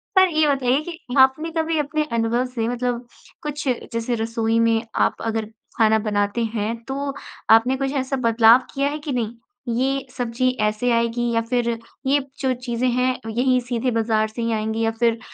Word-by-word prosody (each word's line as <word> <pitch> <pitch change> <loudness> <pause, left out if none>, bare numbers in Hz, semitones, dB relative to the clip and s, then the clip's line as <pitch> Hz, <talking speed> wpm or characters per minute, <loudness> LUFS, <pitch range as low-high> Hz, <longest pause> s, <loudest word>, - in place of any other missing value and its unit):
पर 375 0 +7
ये 310 -1 +3
बताइए 270 -1 +2
कि 330 +1 -7 0.2
आपने 265 +5 +4
कभी 320 0 0
अपने 300 +1 0
अनुभव 230 +2 +1
से 235 -3 -3
मतलब 245 0 -2 0.4
कुछ 295 -1 -4 0.3
जैसे 230 +1 -1
रसोई 225 0 0
में 230 -1 +3
आप - - +2
अगर 225 -1 -1 0.3
खाना 220 -1 +4
बनाते 205 +1 0
हैं, 220 0 -2
तो 275 +1 -3 0.4
आपने 225 +4 +5
कुछ 270 0 -1
ऐसा 260 +1 -2
बदलाव 230 0 +6
किया 275 +1 +1
है 300 +1 -4
कि 295 -1 -5
नहीं 235 -2 -2 0.4
ये 270 +2 0
सब्ज़ी 245 +1 0
ऐसे 215 +3 +1
आएगी 235 +1 +1
या 230 - +2
फ़िर 235 +1 0 0.4
ये 280 +2 +4 0.2
जो 260 -2 +1
चीज़ें 245 0 -2
हैं 250 +1 +1
यहीं 250 +3 +2
सीधे 245 +1 -1
बाज़ार 220 -1 +1
से 220 +2 -7
ही 230 0 0
आएँगी 220 +1 -2
या 225 - +2
फ़िर 230 -1 +2
240 Hz, 180 wpm, -22 LUFS, 225-265 Hz, 0.4 s, पर